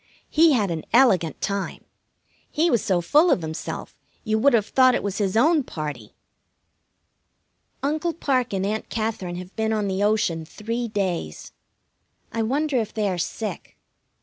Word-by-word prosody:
He 320 0 +5
had 205 -7 +1
an 160 -2 -3
elegant 185 - +4
time. 200 -1 -3 0.7
He 325 +2 +1
was 235 - +3
so 180 -3 +1
full 300 - +4
of 175 - +2
himself 160 +1 -6 0.3
you 220 -1 0
would 280 +4 +4
have 220 -3 +3
thought 255 +1 +4
it - - -2
was 200 0 -3
his 200 0 0
own 310 +6 +4
party. 150 - -6 1.7
Uncle 310 +4 0
Parke 255 -7 0
and 190 0 -1
Aunt 215 +2 -3
Katherine 215 -6 -3
have 180 +1 -9
been 220 0 0
on 210 -2 0
the 190 0 -1
ocean 205 -6 +1
three 230 +8 -4
days. 185 - -3 0.8
I 225 - -2
wonder 275 +5 0
if 220 -3 -1
they 215 -2 0
are 180 -2 -2
sick. 215 +5 -5
215 Hz, 160 wpm, -24 LUFS, 185-255 Hz, 1.7 s, He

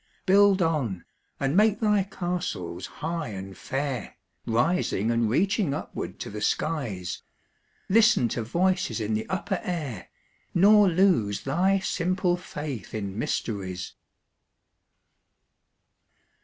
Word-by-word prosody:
Build 200 0 +5
on, 130 - -1 0.3
and 135 +2 0
make 210 +1 +4
thy 210 -2 +3
castles 175 - -4 0.2
high 165 -2 -2
and 95 -2 -7
fair, 135 -2 -4 0.3
Rising 120 - +1
and 115 -1 +1
reaching 180 - +1
upward - - -6
to - - -5
the 105 +1 -6
skies; 105 - -2 0.7
Listen 220 - +5
to 120 - -2
voices 180 - 0
in 110 0 -1
the 110 +1 -2
upper 190 0 -1
air, 150 - -4 0.5
Nor 205 +2 +6
lose 165 - +2
thy 180 +8 +2
simple 185 -1 0
faith 145 - -6
in 100 -1 -4
mysteries. 95 -6 -3
155 Hz, 110 wpm, -26 LUFS, -, 0.7 s, Nor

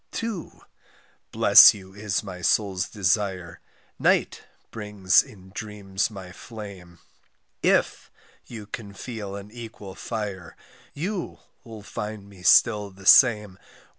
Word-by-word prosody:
=To= 225 -6 -6 0.7
bless - - +8
you 95 -1 -13
is 105 -1 -3
my 90 -3 -9
soul's 95 -1 0
desire, 95 -4 -1 0.4
=Night= - - +1 0.3
brings 105 -3 +2
in 95 -2 -16
dreams 100 -2 -3
my 95 -4 -10
flame, 95 -5 -11 0.6
=If= - - +1 0.4
you 110 -3 -9
can 100 -1 -8
feel 105 -3 -7
an 100 +1 -10
equal 110 -4 -10
fire, 100 -5 -6 0.4
=You= 180 +5 -4 0.3
'll 110 -3 -11
find 105 0 -7
me 100 -2 -16
still 105 +2 +4
the 95 0 -16
same. 105 -5 +5
100 Hz, 115 wpm, -24 LUFS, 95-110 Hz, 0.7 s, bless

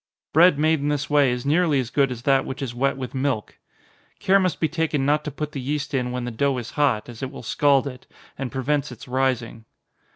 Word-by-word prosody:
Bread 170 0 +6
made 155 +1 +2
in 145 - -2
this 145 0 -2
way 145 -3 +5
is 125 +1 -3
nearly 155 -1 +3
as 120 -2 -3
good 135 -1 +2
as 120 -1 -6
that 135 -1 +3
which 135 +1 -5
is 120 -3 -4
wet 135 +2 0
with 130 -2 -6
milk. 130 -5 -2 0.6
Care 195 +1 +3
must 185 -4 0
be 160 - +2
taken 160 -4 -1
not 150 +1 +2
to - - -2
put 150 +1 -5
the 140 - -5
yeast 140 +1 -3
in 125 -2 0
when 125 -1 -3
the 120 - -4
dough 135 +3 0
is 120 -1 -6
hot, 130 -8 +1
as 120 -2 -10
it 135 - -3
will 135 - -10
scald 140 -2 +3
it, 125 -2 -8 0.3
and 135 -2 -5
prevents 140 +1 -1
its 120 - -11
rising. 125 -3 -1
135 Hz, 235 wpm, -23 LUFS, 125-150 Hz, 0.6 s, Bread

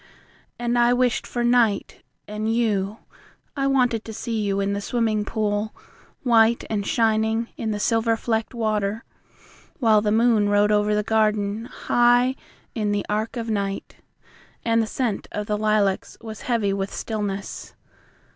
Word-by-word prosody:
And 240 0 0
I 240 0 +4
wished 245 -1 +1
for 240 - -2
night 240 -4 +2 0.3
and 215 +1 -2
you. 215 -3 0 0.6
I 275 -1 0
wanted 245 -5 +2
to 220 - -7
see 225 0 -3
you 200 -1 0
in 200 0 0
the 200 - -2
swimming 220 -2 0
pool, 210 0 -2 0.5
White 230 -2 +4
and 205 -2 -1
shining 225 0 +1
in 225 - -3
the 210 -1 -2
silver 225 +1 +1
flecked 225 +1 -2
water. 215 0 -1 0.7
While 220 -5 +4
the 210 0 0
moon 220 -2 +3
rode 205 +1 +3
over 210 0 +2
the 210 - +1
garden, 215 0 +1
High 245 +1 +2 0.4
in 210 -3 -1
the 205 -1 -1
arch 215 +4 -2
of 230 -1 -3
night, 200 -2 -3 0.7
And 230 0 +3
the 220 - -1
scent 230 -2 -2
of 210 - -3
the 210 - -1
lilacs 210 -2 0
was 220 -2 -8
heavy 215 -5 +1
with 195 0 -3
stillness. 205 -3 -5
220 Hz, 155 wpm, -23 LUFS, 210-235 Hz, 0.7 s, I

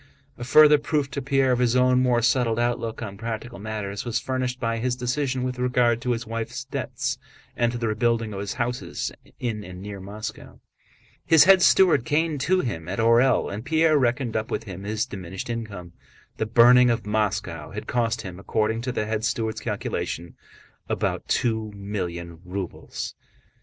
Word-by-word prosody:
A 120 - -7
further 150 +4 +7
proof 145 -2 -1
to 140 - -3
Pierre 135 -1 +2
of 125 - +1
his 125 -1 +2
own 125 0 +4
more 120 -2 +2
settled 120 -1 +2
outlook 120 -1 -1
on 100 -3 -7
practical 115 +1 -5
matters 105 -1 -4
was 120 -1 -1
furnished 130 -1 -2
by 115 -2 -1
his 125 +1 0
decision 130 +1 -1
with 125 0 -3
regard 125 -2 +2
to 125 - -3
his 115 0 -4
wife's 115 +3 -4
debts - - -3 0.4
and 120 -1 +1
to 120 - -4
the 115 -1 -1
rebuilding 115 0 0
of 95 - -5
his 100 0 -3
houses 125 0 -3 0.3
in 110 -4 -3
and 90 -2 -9
near 100 +1 -7
Moscow. 105 +3 -8 0.6
His 160 -2 +7
head 190 -1 +7
steward 180 -9 +5
came 155 +1 0
to 185 +6 +2
him 80 -10 -4
at 95 - -3
Orël 115 0 +3
and 105 +2 -5
Pierre 160 +2 +3
reckoned 125 -1 0
up 110 0 -1
with - - -2
him 95 -2 -8
his 105 +1 -1
diminished 95 +3 -6
income. 100 -7 -6 0.4
The 110 - -1
burning 125 +2 +7
of 115 -3 0
Moscow 100 -7 -1
had - - -6
cost 115 -1 0
him, 90 -1 -8
according 110 +3 0
to 125 +1 -2
the 105 - -2
head 110 0 -2
steward's 110 -1 -1
calculation, 85 +1 -3 0.6
about - - -1
two 110 -2 0
million 90 -5 -5
rubles. 95 0 -5
115 Hz, 180 wpm, -25 LUFS, 105-125 Hz, 0.6 s, further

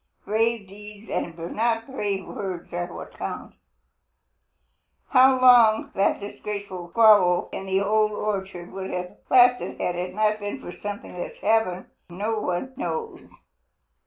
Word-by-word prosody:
Brave 225 0 0
deeds 210 +2 -12
and 170 -1 -3 0.2
not 225 0 +1
brave 205 -7 -3
words 185 -4 -6
are 175 0 -3
what - - -9
count. - - -5 1.6
How 260 0 +6
long 240 -4 +6
that 195 +1 +1
disgraceful 200 -3 -6
squabble 200 -3 +5
in 195 - -6
the 190 0 +1
Old 215 +1 +2
Orchard 195 -4 -4
would 190 0 -6
have 180 0 -5
lasted 250 -1 +4
had 180 - -1
it 180 +1 -4
not 215 0 +1
been 205 0 -5
for - - -8
something 205 0 -7
which - - -6
happened, 210 -4 +1 0.2
no 210 +5 -2
one 195 +8 -3
knows. 455 -2 -4
205 Hz, 135 wpm, -24 LUFS, 185-225 Hz, 1.6 s, How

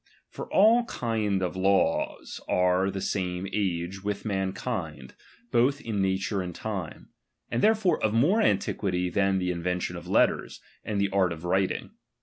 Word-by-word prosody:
^H - - -55 0.3
For - - -8
all 225 +4 +5
kind 110 - -1
of 90 - -2
laws 95 +1 0
are 90 +1 +2
of 100 - -3
the 95 - -4
same 90 -1 -2
age 95 -1 -2
with 100 0 -3
^B - - -3
mankind, 95 - -3 0.4
both 130 +4 +3
in 110 -6 -2
nature 95 +1 0
and 90 -2 -6
time; 100 -7 -5 0.4
and 115 - 0
therefore 215 -4 +3
^M - - -16
of 110 - +2
more 170 - +4
antiquity 95 - 0
than 95 +1 +2
the 90 -1 0
invention 90 +1 -2
of - - -8
letters, - - +2
^M - - -32 0.3
and 100 - 0
the 100 - 0
art 95 -2 +2
of 80 0 -7
writing. 95 +2 0
95 Hz, 175 wpm, -27 LUFS, 90-110 Hz, 0.4 s, all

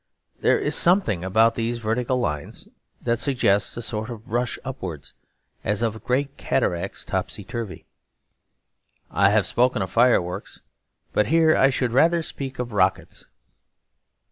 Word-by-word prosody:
There - - +3
is - - -1
something 170 - +3
about 110 +5 +3
these 115 +1 -2
vertical 120 +3 -1
lines 75 -11 -4 0.4
that 120 -1 0
suggests 120 -8 +1
a 120 - -4
sort 110 0 -4
of 115 -2 -9
rush 120 +1 -1
upwards, 95 - -6 0.5
as 105 +3 0
of 110 -1 -2
great 140 +3 -1
cataracts 90 -9 -1
topsy 100 - -3
turvy. 110 0 -6 1.3
I 100 0 +4
have 105 -1 +3
spoken 125 -4 +1
of 95 - -6
fireworks, 115 -7 +1 0.5
but 105 - +2
here 160 +1 +4
I 135 - +5
should 125 -2 -1
rather 165 +6 +3
speak 135 -3 -6
of 120 -2 -4
rockets. 95 -1 0
115 Hz, 140 wpm, -23 LUFS, 105-125 Hz, 1.3 s, I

